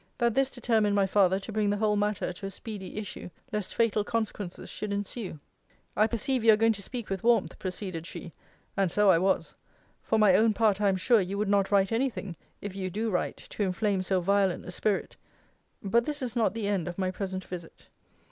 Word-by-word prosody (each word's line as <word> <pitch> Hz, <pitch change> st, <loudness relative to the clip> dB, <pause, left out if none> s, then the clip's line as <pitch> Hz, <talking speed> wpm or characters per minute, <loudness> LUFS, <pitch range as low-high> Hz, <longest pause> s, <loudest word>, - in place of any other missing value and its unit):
That 235 Hz, -2 st, +2 dB
this 270 Hz, +2 st, +2 dB
determined 220 Hz, -5 st, +1 dB
my 200 Hz, -1 st, +4 dB
father 190 Hz, -1 st, +3 dB
to 220 Hz, -, -7 dB
bring 210 Hz, -1 st, +1 dB
the 205 Hz, -, +1 dB
whole 210 Hz, 0 st, +2 dB
matter 205 Hz, -2 st, 0 dB
to 195 Hz, -, -8 dB
a -, -, -4 dB
speedy 200 Hz, -1 st, -7 dB
issue, 210 Hz, -4 st, -6 dB, 0.2 s
lest 210 Hz, -3 st, -3 dB
fatal 225 Hz, -2 st, +2 dB
consequences 210 Hz, -4 st, -3 dB
should 210 Hz, -1 st, -5 dB
ensue. 200 Hz, -4 st, -4 dB, 0.6 s
I 215 Hz, -, +4 dB
perceive 240 Hz, +2 st, 0 dB
you 225 Hz, -, +8 dB
are -, -, +3 dB
going 225 Hz, +1 st, +4 dB
to 205 Hz, -, -7 dB
speak 235 Hz, +1 st, -6 dB
with 190 Hz, -2 st, -2 dB
warmth, 235 Hz, 0 st, +2 dB
proceeded 185 Hz, -3 st, -4 dB
she: 170 Hz, -, -8 dB, 0.4 s
[and 195 Hz, -3 st, +1 dB
so 210 Hz, +1 st, +5 dB
I 165 Hz, -, +4 dB
was] 190 Hz, +2 st, +1 dB, 0.5 s
for 220 Hz, -, 0 dB
my 210 Hz, -3 st, +6 dB
own 220 Hz, +2 st, +4 dB
part 210 Hz, -2 st, +2 dB
I 205 Hz, -, +4 dB
am 190 Hz, -, +1 dB
sure, 225 Hz, +3 st, +4 dB
you 190 Hz, +2 st, -3 dB
would 210 Hz, 0 st, 0 dB
not 200 Hz, -1 st, +3 dB
write 195 Hz, 0 st, +3 dB
any 250 Hz, +4 st, +2 dB
thing, 195 Hz, -7 st, -7 dB, 0.3 s
if 200 Hz, -2 st, -6 dB
you 190 Hz, -1 st, -3 dB
do 220 Hz, +4 st, -2 dB
write, 180 Hz, -, -1 dB
to -, -, -5 dB
inflame 195 Hz, 0 st, +1 dB
so 185 Hz, 0 st, +1 dB
violent 195 Hz, 0 st, +1 dB
a 180 Hz, -, -6 dB
spirit. 200 Hz, +2 st, -1 dB, 0.7 s
But 235 Hz, +4 st, +2 dB
this 295 Hz, -2 st, -3 dB
is 245 Hz, -1 st, -4 dB
not 220 Hz, -4 st, +1 dB
the 220 Hz, -3 st, -2 dB
end 195 Hz, -5 st, 0 dB
of 175 Hz, -, -5 dB
my 185 Hz, -1 st, 0 dB
present 190 Hz, -1 st, -4 dB
visit. 175 Hz, -2 st, -9 dB
205 Hz, 220 wpm, -28 LUFS, 190-220 Hz, 0.7 s, you